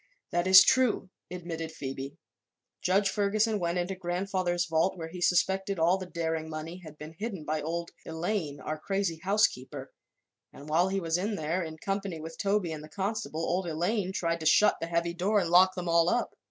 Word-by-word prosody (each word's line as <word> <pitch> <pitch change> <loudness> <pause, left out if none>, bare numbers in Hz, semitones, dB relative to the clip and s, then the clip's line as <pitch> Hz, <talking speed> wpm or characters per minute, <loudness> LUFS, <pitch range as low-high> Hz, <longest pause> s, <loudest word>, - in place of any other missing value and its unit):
"That 175 +1 0
is 190 0 +10
true," 250 -7 +2 0.2
admitted 165 -2 -5
Phoebe. 135 0 -6 0.6
"Judge 195 +2 +2
Ferguson 210 +2 +1
went 170 0 -1
into 180 +2 -1
grandfather's 180 -1 -1
vault, 165 +3 +1
where 165 -1 -6
he 180 +1 -8
suspected 190 +2 +2
all 170 +4 +3
the 185 - -6
Daring 160 -2 -3
money 160 +2 -6
had 155 -2 -11
been 155 +1 -9
hidden 195 -3 -5
by 155 0 -1
old 170 +2 -3
Elaine, 160 -3 -3
our 155 0 -4
crazy 195 -2 -1
housekeeper, 145 - 0 0.6
and 145 - -12
while 170 +4 +3
he 195 0 0
was 165 -1 0
in 205 +3 -1
there, 165 +2 -1
in 160 -2 -6
company 195 -1 -3
with 160 +1 -9
Toby 200 -4 +1
and 155 -1 -6
the 155 - -11
constable, 190 -6 -3
old 180 +1 -1
Elaine 180 +5 -1
tried 170 -3 -1
to 160 - -1
shut 210 - +5
the 165 - -2
heavy 170 0 0
door 190 +5 +1
and 175 -4 +1
lock 185 +1 +6
them 180 -1 -4
all 170 0 +4
up. 240 - -1
175 Hz, 195 wpm, -29 LUFS, 160-190 Hz, 0.6 s, is